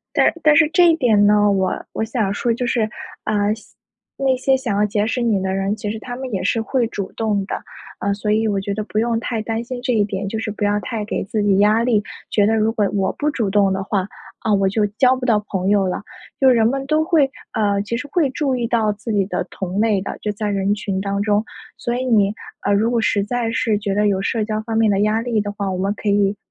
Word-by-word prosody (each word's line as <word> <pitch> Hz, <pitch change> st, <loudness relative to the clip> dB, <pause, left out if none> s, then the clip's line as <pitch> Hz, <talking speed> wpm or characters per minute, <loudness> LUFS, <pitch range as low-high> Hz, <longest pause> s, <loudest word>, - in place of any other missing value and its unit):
但 -, -, +4 dB
但 300 Hz, -1 st, +5 dB
是 325 Hz, -2 st, +5 dB
这 350 Hz, +1 st, +6 dB
一 330 Hz, -, +4 dB
点 220 Hz, -9 st, +4 dB
呢， 205 Hz, 0 st, +4 dB
我 190 Hz, -2 st, 0 dB
我 220 Hz, -, -1 dB
想 220 Hz, -3 st, -1 dB
说 235 Hz, -, 0 dB
就 245 Hz, +2 st, -2 dB
是， 230 Hz, -3 st, +1 dB, 0.4 s
呃， 210 Hz, 0 st, +1 dB
想 220 Hz, -, -17 dB, 0.5 s
那 265 Hz, -1 st, +2 dB
些 265 Hz, +1 st, +2 dB
想 240 Hz, -6 st, -2 dB
要 210 Hz, -, +3 dB
结 205 Hz, +1 st, 0 dB
识 245 Hz, -, -1 dB
你 220 Hz, -4 st, +2 dB
的 190 Hz, -, -1 dB
人， 195 Hz, +2 st, -1 dB
其 210 Hz, -1 st, -4 dB
实 220 Hz, -, -6 dB
他 245 Hz, +2 st, -6 dB
们 260 Hz, -1 st, -6 dB
也 190 Hz, -, -1 dB
是 225 Hz, +4 st, +1 dB
会 240 Hz, +1 st, 0 dB
主 200 Hz, -4 st, -5 dB
动 210 Hz, -3 st, -1 dB
的。 -, -, -4 dB, 0.4 s
呃， 200 Hz, -, 0 dB
所 210 Hz, +1 st, -3 dB
以 220 Hz, +1 st, +2 dB
我 200 Hz, -1 st, 0 dB
觉 200 Hz, +1 st, -3 dB
得 215 Hz, -, -2 dB
不 215 Hz, -, -3 dB
用 230 Hz, 0 st, +1 dB
太 230 Hz, -2 st, -3 dB
担 225 Hz, +1 st, -2 dB
心 245 Hz, 0 st, -6 dB
这 250 Hz, 0 st, 0 dB
一 210 Hz, -3 st, +3 dB
点， 195 Hz, -1 st, -3 dB
就 220 Hz, -, -3 dB
是 225 Hz, -1 st, -3 dB
不 210 Hz, 0 st, -3 dB
要 205 Hz, 0 st, +2 dB
太 220 Hz, -2 st, -4 dB
给 210 Hz, -, -3 dB
自 210 Hz, +1 st, -2 dB
己 200 Hz, -2 st, +3 dB
压 210 Hz, +3 st, +4 dB
力， 225 Hz, -4 st, +2 dB, 0.3 s
觉 205 Hz, -2 st, +3 dB
得 225 Hz, +1 st, +2 dB
如 220 Hz, +1 st, +2 dB
果 210 Hz, -3 st, +1 dB
我 195 Hz, -2 st, +1 dB
不 300 Hz, +1 st, +1 dB
主 225 Hz, -8 st, -1 dB
动 195 Hz, -1 st, +3 dB
的 190 Hz, -, -2 dB
话， 195 Hz, -3 st, -1 dB, 0.3 s
啊， 215 Hz, -2 st, +1 dB
我 195 Hz, -1 st, +2 dB
就 210 Hz, +1 st, +1 dB
交 255 Hz, -1 st, +5 dB
不 255 Hz, -, -5 dB
到 210 Hz, -4 st, +2 dB
朋 190 Hz, -1 st, -1 dB
友 200 Hz, -2 st, +3 dB
了， 180 Hz, -, -3 dB, 0.4 s
就 265 Hz, -, +6 dB
是 250 Hz, -, +6 dB
人 225 Hz, -1 st, +3 dB
们 270 Hz, +1 st, -2 dB
都 310 Hz, +2 st, +2 dB
会 310 Hz, -6 st, +3 dB, 0.2 s
呃， 200 Hz, -2 st, +1 dB
其 210 Hz, +3 st, -3 dB
实 270 Hz, +4 st, -5 dB
会 300 Hz, -6 st, +2 dB
注 275 Hz, -1 st, -1 dB
意 235 Hz, -1 st, -1 dB
到 220 Hz, -3 st, +2 dB
自 215 Hz, +2 st, -5 dB
己 200 Hz, -2 st, +2 dB
的 190 Hz, -, -2 dB
同 190 Hz, +1 st, -4 dB
类 215 Hz, -3 st, +2 dB
的， -, -, -5 dB
就 210 Hz, -, -1 dB
在 210 Hz, 0 st, -3 dB
人 200 Hz, 0 st, +1 dB
群 195 Hz, -2 st, -3 dB
当 200 Hz, 0 st, -2 dB
中。 210 Hz, 0 st, +1 dB, 0.3 s
所 240 Hz, -, -3 dB
以 255 Hz, -, -2 dB
你， 210 Hz, -5 st, +3 dB, 0.3 s
呃， 200 Hz, -, +2 dB
如 215 Hz, +3 st, +2 dB
果 240 Hz, -1 st, +1 dB
实 205 Hz, -2 st, +1 dB
在 235 Hz, +1 st, -1 dB
是 230 Hz, -3 st, +1 dB
觉 200 Hz, -1 st, -2 dB
得 210 Hz, +1 st, +2 dB
有 195 Hz, -2 st, +1 dB
社 220 Hz, +1 st, 0 dB
交 215 Hz, 0 st, -2 dB
方 225 Hz, 0 st, -3 dB
面 225 Hz, -1 st, +4 dB
的 195 Hz, -1 st, +1 dB
压 215 Hz, +2 st, +2 dB
力 230 Hz, -2 st, 0 dB
的 205 Hz, 0 st, -3 dB
话， 200 Hz, -1 st, -3 dB
我 -, -, -2 dB
们 195 Hz, +2 st, 0 dB
可 210 Hz, -, -4 dB
以， 200 Hz, 0 st, +2 dB
215 Hz, 285 characters per minute, -20 LUFS, 200-235 Hz, 0.5 s, 这